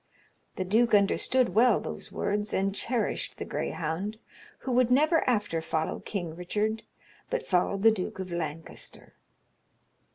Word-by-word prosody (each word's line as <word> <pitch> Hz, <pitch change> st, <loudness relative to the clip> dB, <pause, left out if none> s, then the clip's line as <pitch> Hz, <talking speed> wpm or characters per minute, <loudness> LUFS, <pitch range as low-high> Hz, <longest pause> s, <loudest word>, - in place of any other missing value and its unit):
The 185 Hz, -, -2 dB
duke 225 Hz, +5 st, +3 dB
understoode 235 Hz, +5 st, +3 dB
well 225 Hz, +4 st, +4 dB
those -, -, -6 dB
words, 205 Hz, +1 st, -1 dB
and 195 Hz, +1 st, +1 dB
cheryshed 235 Hz, +3 st, -1 dB
the -, -, -5 dB
grayhounde, 180 Hz, +7 st, -3 dB, 0.4 s
who 265 Hz, -, -3 dB
would 250 Hz, -1 st, +4 dB
never 310 Hz, +6 st, +4 dB
after 205 Hz, -8 st, 0 dB
followe 160 Hz, 0 st, -2 dB
Kynge 175 Hz, -6 st, -4 dB
Richarde, 210 Hz, +5 st, -1 dB, 0.5 s
but -, -, -2 dB
followed 195 Hz, +2 st, +1 dB
the 225 Hz, -, +8 dB
Duke 195 Hz, -4 st, -3 dB
of 185 Hz, -1 st, -5 dB
Lancaster." 165 Hz, -2 st, -6 dB
205 Hz, 135 wpm, -28 LUFS, 180-235 Hz, 0.5 s, the